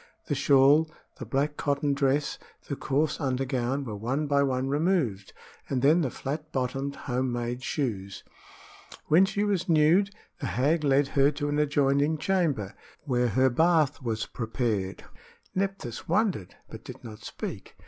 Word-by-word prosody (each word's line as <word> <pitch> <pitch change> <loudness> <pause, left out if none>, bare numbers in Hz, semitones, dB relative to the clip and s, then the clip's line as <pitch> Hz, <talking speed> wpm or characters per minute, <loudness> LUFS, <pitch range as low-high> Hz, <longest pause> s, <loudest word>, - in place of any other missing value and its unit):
The - - -2
shawl, 145 +2 +5 0.3
the - - -7
black 145 +2 -1
cotton 145 -1 0
dress, 140 +1 0 0.3
the 140 - -3
coarse 145 +2 0
undergown, 130 -1 -1
were 110 -4 -5
one 125 +9 -2
by 140 -1 +2
one 130 -1 0
removed, 145 - 0 0.4
and 130 -1 -1
then 155 +5 +5
the 140 - 0
flat 150 +5 -5
bottomed 135 +2 -2
home 130 -1 -1
made 120 +1 -3
shoes. 100 -9 -3 0.9
When 175 +5 +6
she 205 +1 -1
was 195 -3 0
nude, 165 +5 +4 0.3
the 140 - -3
hag 150 +6 +1
led 140 0 +3
her 140 -1 +4
to 145 0 -2
an 145 0 0
adjoining 145 +1 +2
chamber, 155 - 0 0.3
where 125 -4 +1
her 130 +4 +3
bath 160 0 +2
was 110 -3 -2
prepared. 110 -5 -3 0.5
Nephthys 195 - -3
wondered, 185 - 0
but - - -10
did - - -10
not 110 -2 -9
speak. - - -7
140 Hz, 150 wpm, -27 LUFS, 125-155 Hz, 0.9 s, When